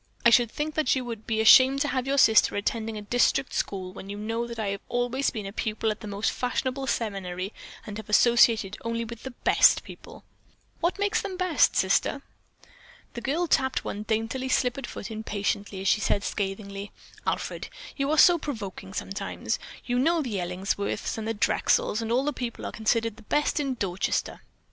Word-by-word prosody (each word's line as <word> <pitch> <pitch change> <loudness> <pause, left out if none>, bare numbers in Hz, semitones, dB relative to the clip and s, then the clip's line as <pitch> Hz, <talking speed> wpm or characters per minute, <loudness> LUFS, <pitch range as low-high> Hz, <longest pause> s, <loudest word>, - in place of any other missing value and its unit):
I 235 - +8
should 235 0 +5
think 300 +5 -3
that 305 -4 +2
you 255 -1 -2
would 230 -2 -7
be 220 -1 +1
ashamed 260 +5 +7
to 290 - +2
have 260 -1 -1
your 280 +1 +1
sister 220 -5 +5
attending 220 +1 -2
a 210 - -6
district 245 +4 +1
school 185 -2 -3
when 195 - -10
you 205 - -5
know 225 +3 -2
that 235 -1 -7
I 215 -3 -1
have 200 0 -4
always 245 +3 0
been 215 -4 -6
a 195 - -6
pupil 220 0 -1
at 215 - -7
a - - -6
most 205 +1 -1
fashionable 260 +2 -2
seminary 195 -4 -3 0.3
and 210 -1 -6
have 220 - -9
associated 225 -2 +4
only 230 0 -2
with 235 0 -9
the 265 - -6
best 245 - +4
people." - - -12 0.6
"What 345 +3 0
makes 410 +2 +1
them 400 -1 -5
the - - -7
best, 365 -3 +3
Sister?" - - +1 0.9
The 235 - -6
girl 305 +8 0
tapped 265 -5 +1
one 205 - -4
daintily 225 +5 -2
slippered 255 0 0
foot 210 - -7
impatiently 205 -2 -3
as 195 - -2
she 210 - +3
said 200 - +1
scathingly: 200 0 -4 0.4
"Alfred, - - -2 0.3
you 275 0 -1
are 310 - +1
so 345 +2 +7
provoking 205 -9 -6
sometimes. 195 - -3 0.3
You 245 0 0
know 325 +4 +2
the 220 -7 -3
Ellingsworths 190 +4 -2
and 220 - -4
the 225 - -1
Drexels 210 +1 +1
and 225 0 -3
all 250 +3 +2
those 295 - 0
people 240 -2 -5
are - - -4
considered 225 0 0
the - - -14
best 295 +7 0
in 275 -3 -1
Dorchester." 195 -5 -2
230 Hz, 195 wpm, -26 LUFS, 205-260 Hz, 0.9 s, I